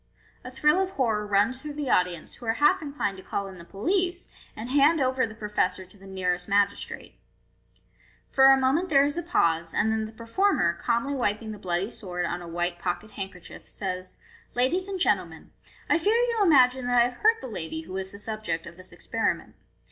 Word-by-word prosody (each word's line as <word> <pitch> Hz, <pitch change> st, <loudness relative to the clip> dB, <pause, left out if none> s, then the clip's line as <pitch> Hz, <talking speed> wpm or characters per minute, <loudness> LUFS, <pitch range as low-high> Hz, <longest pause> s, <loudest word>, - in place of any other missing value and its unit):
A 255 Hz, -, -7 dB
thrill 300 Hz, +7 st, +3 dB
of 380 Hz, -, 0 dB
horror 225 Hz, -, 0 dB
runs 205 Hz, +6 st, +2 dB
through 300 Hz, 0 st, -7 dB
the 290 Hz, -3 st, -2 dB
audience, 180 Hz, -3 st, 0 dB
who 235 Hz, -, -11 dB
are 225 Hz, -, +3 dB
half 295 Hz, +6 st, +3 dB
inclined 280 Hz, -10 st, -3 dB
to 190 Hz, -, -11 dB
call 200 Hz, -, -3 dB
in 190 Hz, -2 st, -10 dB
the -, -, -10 dB
police, 355 Hz, -, -1 dB, 0.3 s
and 220 Hz, -, -6 dB
hand 290 Hz, +4 st, +4 dB
over 260 Hz, -2 st, +1 dB
the 215 Hz, -, -11 dB
professor 210 Hz, -4 st, -1 dB
to 185 Hz, -, -18 dB
the 195 Hz, -1 st, -15 dB
nearest 180 Hz, -2 st, -2 dB
magis 200 Hz, 0 st, +2 dB
trate. -, -, -9 dB, 1.1 s
For 265 Hz, -, +5 dB
a 270 Hz, 0 st, +8 dB
moment 275 Hz, +8 st, +1 dB
there 275 Hz, -2 st, +5 dB
is 290 Hz, +1 st, -1 dB
a 345 Hz, -, -1 dB
pause, 165 Hz, -, +1 dB
and 220 Hz, -, +2 dB
then 220 Hz, 0 st, 0 dB
the 215 Hz, -, -8 dB
performer, 230 Hz, -, +1 dB
calmly 235 Hz, +10 st, -1 dB
wiping 220 Hz, -4 st, -1 dB
the 210 Hz, -, -8 dB
bloody 185 Hz, +3 st, -1 dB
sword 180 Hz, -4 st, -4 dB
on 175 Hz, +1 st, -3 dB
a 175 Hz, -, -9 dB
white 175 Hz, +1 st, -2 dB
pocket 180 Hz, +4 st, -3 dB
handkerchief, 190 Hz, -3 st, -8 dB
says. 185 Hz, -2 st, -4 dB, 0.4 s
"Ladies 330 Hz, +10 st, +1 dB
and 390 Hz, -1 st, -4 dB
gentlemen, 180 Hz, -, 0 dB, 0.4 s
I -, -, +3 dB
fear 415 Hz, +7 st, +2 dB
you 475 Hz, -1 st, +1 dB
imagine 260 Hz, -8 st, +4 dB
that 245 Hz, 0 st, +3 dB
I -, -, +7 dB
have 245 Hz, -, -14 dB
hurt 445 Hz, +1 st, +4 dB
the 260 Hz, -, -7 dB
lady 160 Hz, -7 st, -5 dB
who 175 Hz, +3 st, -10 dB
was 190 Hz, 0 st, -4 dB
the 200 Hz, -, -10 dB
subject 210 Hz, -5 st, -4 dB
of 170 Hz, 0 st, -11 dB
this 185 Hz, 0 st, -13 dB
experiment. -, -, -2 dB
220 Hz, 210 wpm, -26 LUFS, 185-280 Hz, 1.1 s, a